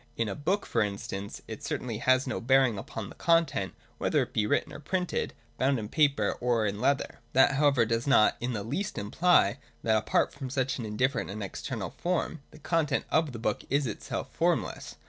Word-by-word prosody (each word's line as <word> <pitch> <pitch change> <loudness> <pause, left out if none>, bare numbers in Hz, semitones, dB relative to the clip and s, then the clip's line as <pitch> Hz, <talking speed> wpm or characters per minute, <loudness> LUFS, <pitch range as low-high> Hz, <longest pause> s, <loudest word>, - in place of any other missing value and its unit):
In 115 - 0
a 100 - -2
book, 185 - -1
for 115 - 0
instance, 100 -1 -4
it - - -7
certainly 115 -4 -3
has 130 +2 +3
no 130 - -3
bearing 130 -3 +3
upon 105 0 -6
the - - -10
content, 165 - +1 0.2
whether - - +2
it - - -10
be 105 -1 +1
written - - 0
or - - -8
printed, 180 +4 -2 0.2
bound 135 +1 +3
in 105 -2 -4
paper 140 -9 +3
or 120 -3 +2
in 100 +1 -2
leather. 140 0 0
That 130 - +6
however 140 -4 +3
does 115 +3 -1
not 135 -6 +5
in 125 +1 -2
the 105 -3 -3
least 150 - -3
imply 105 - +3 0.2
that 110 -1 +3
apart 110 - +1
from 135 -2 -6
such 130 0 -1
an 115 - -4
indifferent 125 +3 0
and 105 +1 -5
external 95 - -5
form, 175 -3 -2
the - - -15
content 155 -2 0
of 160 -2 +2
the 120 - -7
book 115 - -1
is 140 +1 +2
itself 110 - -5
formless. - - -1
130 Hz, 200 wpm, -29 LUFS, 110-145 Hz, 0.2 s, That